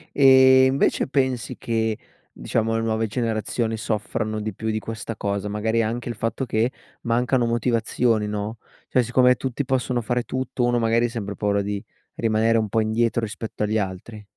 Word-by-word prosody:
Ehm, 130 -1 +7
invece 135 - +1
pensi 130 -3 -1
che, 110 -1 -1 0.3
diciamo, 115 0 -1
le 115 - -1
nuove 110 0 0
generazioni 110 0 -2
soffrano 110 0 -2
di 110 0 -3
più 110 +4 -5
di 110 - -1
questa 110 0 -6
cosa, 100 0 -2
magari 110 +2 0
anche 120 +2 -3
il - - -3
fatto 115 +4 -2
che 115 0 0 0.3
mancano 120 +1 +1
motivazioni 115 -1 +1
no, 105 +2 -4 0.3
cioè 125 - +3
siccome 125 +2 +4
tutti 135 +2 -3
possono 125 -1 0
fare 120 +2 -1
tutto, 130 -1 -2
uno 120 0 +2
magari 115 +1 +2
ha - - -4
sempre 105 -4 -5
paura 100 -1 0
di 100 0 -3 0.3
rimanere 115 0 +2
un 110 -1 0
po' 110 +2 +1
indietro 115 +2 +1
rispetto 110 0 -5
agli 110 +1 +1
altri. 100 +2 -5
115 Hz, 170 wpm, -23 LUFS, 110-120 Hz, 0.3 s, Ehm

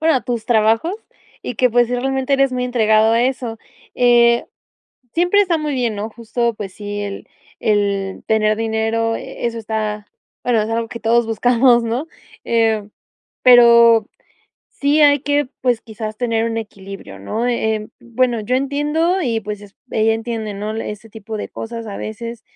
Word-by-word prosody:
bueno, 320 0 +3
a 260 - +2
tus 240 -3 -4
trabajos. 225 - +2 0.5
Y - - -5
qué, 250 +3 +2
pues, 240 +1 +3
sí 250 - -1
realmente 265 +2 0
eres 275 -1 +2
muy 250 0 -1
entregado 220 -2 +3
a 230 - +3
eso. 245 -3 -2 0.4
Eh, 240 -1 +4 0.7
siempre 355 +4 +3
está 355 -5 +2
muy 305 -1 -2
bien, 235 -4 -1
¿no? 210 +2 -3
Justo, 235 +1 -2
pues 205 -3 -7
sí, 205 +1 -6
el 200 -1 -6 0.3
el 200 -2 0
tener 215 -1 +2
dinero, 225 0 0
e - - -8
eso 230 0 -3
está 215 -1 -3 0.4
bueno, 230 -3 +2
es 215 - -4
algo 230 0 -1
que 235 - -8
todos 230 +1 +2
buscamos, 240 +2 +3
¿no? 235 +7 -2 0.4
Eh, 225 -3 +1 0.5
pero 235 -2 +7 0.6
sí 290 +2 +1
hay 285 -1 +5
que, 290 -1 0
pues, 245 -3 +1
quizás, 215 -1 -7
tener 230 -1 0
un 225 - -3
equilibrio, 195 -3 -9
¿no? 225 +3 -2
Em, 220 -3 -1
bueno, 240 -1 0
yo 250 +5 0
entiendo, 295 +7 0
y 230 -6 0
pues 210 -1 -6
es 200 -1 -15
ella 220 0 +2
entiende, 225 -2 -4
¿no?, 210 +2 -4
ese 220 0 -6
tipo 220 0 -7
de 210 - -5
cosas 230 0 -7
a 200 - -6
veces 230 +1 -6
230 Hz, 170 wpm, -19 LUFS, 215-250 Hz, 0.7 s, pero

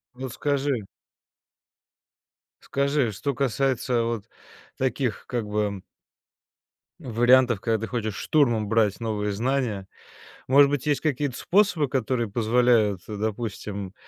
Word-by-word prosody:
Вот 130 -1 -6
скажи 140 -6 -1 1.8
скажи, 140 -3 0
что 140 +8 -3
касается 130 -2 0
вот 115 -3 -3 0.5
таких 130 -2 -1
как 120 -4 -3
бы 105 -2 -2 1.2
ну 125 - -8
вариантов, 120 -1 +4
когда 115 0 0
ты - - -9
хочешь 110 -4 -3
штурмом 120 -9 +1
брать 110 -2 +2
новые 105 -2 -2
знания. 115 -3 -1 0.6
Может 140 +2 +7
быть, 145 -2 -2
есть 145 -2 +1
какие-то 145 -3 -1
способы, 175 -5 +2
которые 125 -2 -1
позволяют, 110 -3 +2
э, 105 - -5
допустим, 105 -2 -4
120 Hz, 115 wpm, -25 LUFS, 105-135 Hz, 1.8 s, Может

